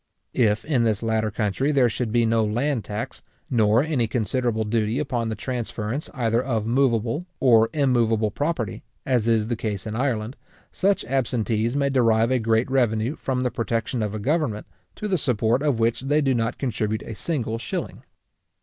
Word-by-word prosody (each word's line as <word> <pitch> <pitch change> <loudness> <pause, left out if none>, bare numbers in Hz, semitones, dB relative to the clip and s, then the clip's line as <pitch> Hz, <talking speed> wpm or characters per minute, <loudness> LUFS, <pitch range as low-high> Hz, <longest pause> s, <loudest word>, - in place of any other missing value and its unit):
If 110 -2 +2
in 135 -6 +2
this 110 -1 0
latter 110 -1 +1
country 110 +7 0
there 135 -4 +4
should 115 0 -2
be 120 0 +3
no 115 0 +2
land 120 +3 0
tax, 105 +1 -5 0.3
nor 110 0 +4
any 145 -7 0
considerable 115 0 0
duty 110 +1 0
upon 125 -6 -1
the 110 - -2
transference 120 +3 -4
either 115 -2 +1
of 115 -5 -1
moveable 120 - +1
or 115 -4 +5
immoveable 115 -7 +2
property, 145 - -2 0.2
as 125 -4 +1
is 110 -2 +2
the 120 - -1
case 105 -4 -4
in 110 0 -4
Ireland, 120 -1 -1 0.3
such 195 +1 +1
absentees 120 -2 0
may 140 -1 +1
derive 115 -2 +3
a 130 - +3
great 115 +1 +2
revenue 120 0 +1
from 130 -4 -2
the 125 -1 0
protection 115 +1 -2
of 105 0 -2
a - - -3
government, 130 -3 0 0.3
to 210 - -4
the 185 -4 +1
support 120 -1 +1
of 145 -6 +1
which 115 0 +2
they 145 +3 +2
do 135 -3 +2
not 115 0 -1
contribute 110 -4 -2
a 115 - -7
single 115 -3 -2
shilling. - - -5
115 Hz, 175 wpm, -24 LUFS, 110-130 Hz, 0.3 s, or